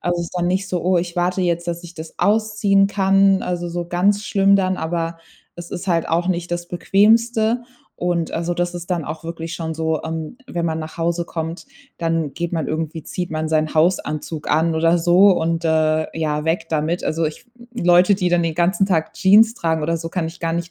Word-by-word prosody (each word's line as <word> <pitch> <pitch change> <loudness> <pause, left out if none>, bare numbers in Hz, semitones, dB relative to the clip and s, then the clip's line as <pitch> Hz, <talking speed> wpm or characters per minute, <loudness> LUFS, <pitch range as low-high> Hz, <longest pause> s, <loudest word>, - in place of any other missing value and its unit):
Also, 175 0 -1
es 170 - -2
ist 180 - -8
dann 175 - 0
nicht 190 +2 0
so: 180 -2 -2
„Oh, 180 -1 +3
ich 170 0 -4
warte 180 +2 0
jetzt, 170 -1 0
dass 170 0 -3
ich 175 0 -11
das 160 -1 -10
ausziehen 210 -2 +2
kann“, 195 -1 +3
also, 175 -1 -3
so 175 0 -4
ganz 200 +4 +1
schlimm 200 -1 +4
dann, 185 -1 0
aber 165 0 -3 0.4
es 175 0 -9
ist 185 +1 -6
halt 170 -2 +1
auch 170 +2 0
nicht 175 -1 -2
das 175 0 -4
Bequemste 225 +5 +2 0.3
und, 175 -2 -1
also, 170 +1 -2
das 175 0 -2
ist 175 +1 -9
dann 170 -4 -2
auch 155 +2 -7
wirklich 165 0 -5
schon 160 -1 -4
so, 160 -1 -1
ähm, 160 +7 -5
wenn 175 -9 -3
man 160 -1 -1
nach 160 +1 -8
Hause 170 +1 0
kommt, 165 +4 -5 0.3
dann 165 -3 -1
geht 170 +4 -4
man 160 -4 -1
irgendwie 160 0 -3
zieht 180 +3 -4
man 155 0 -2
seinen 155 0 0
Hausanzug 155 -2 0
an 160 +2 +2
oder 165 +2 +3
so 180 +4 +5
und, 165 -1 -1
äh, 155 -1 +2
ja, 150 -2 -1
weg 165 +1 -1
damit. 160 +2 -1
Also, 165 +1 -1
ich 155 +10 -8 0.3
Leute, 180 -1 +4
die 185 -2 0
dann 175 -1 +2
den 165 -1 -1
ganzen 185 +3 +2
Tag 160 -4 0
Jeans 220 +4 +5
tragen 160 -6 -1
oder 165 +2 0
so, 165 0 -5
kann 170 -1 -2
ich 165 - -11
gar 165 -1 -2
nicht 170 +1 -3
170 Hz, 215 wpm, -20 LUFS, 160-185 Hz, 0.4 s, so